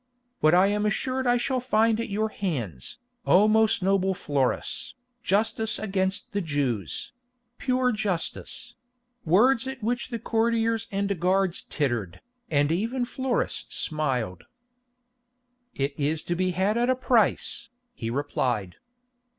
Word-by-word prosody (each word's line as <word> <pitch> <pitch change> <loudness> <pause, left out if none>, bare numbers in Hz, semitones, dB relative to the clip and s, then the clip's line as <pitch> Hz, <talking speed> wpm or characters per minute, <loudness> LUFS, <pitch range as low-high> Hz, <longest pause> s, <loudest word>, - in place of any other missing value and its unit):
"What 155 +2 +5
I 185 +2 +6
am 210 +1 +1
assured 260 +5 -1
I 245 0 +4
shall 255 +1 0
find 225 -2 +2
at 230 - -3
your 215 +2 0
hands, 125 - -4 0.3
O 200 +4 +6
most 220 -1 +3
noble 190 0 +2
Florus, 140 - -1 0.3
justice 220 +2 +1
against 195 +2 -1
the 200 - 0
Jews—pure 240 - -2
justice"; 210 +3 -3 0.5
words 230 +9 +4
at 265 -3 -6
which 240 +2 -1
the 235 - -3
courtiers 230 0 0
and 200 -2 -1
guards 185 +1 +1
tittered, 120 - -2 0.3
and 145 0 +2
even 230 +8 0
Florus 260 0 -1
smiled. 130 - -2 1.3
"It 140 +1 -1
is 150 +2 0
to 175 - -2
be 185 +1 +1
had 195 +5 +1
at 240 +1 +2
a 255 - +4
price," 240 -2 +1 0.2
he 115 - -5
replied. 120 -8 -1
200 Hz, 125 wpm, -26 LUFS, 155-235 Hz, 1.3 s, I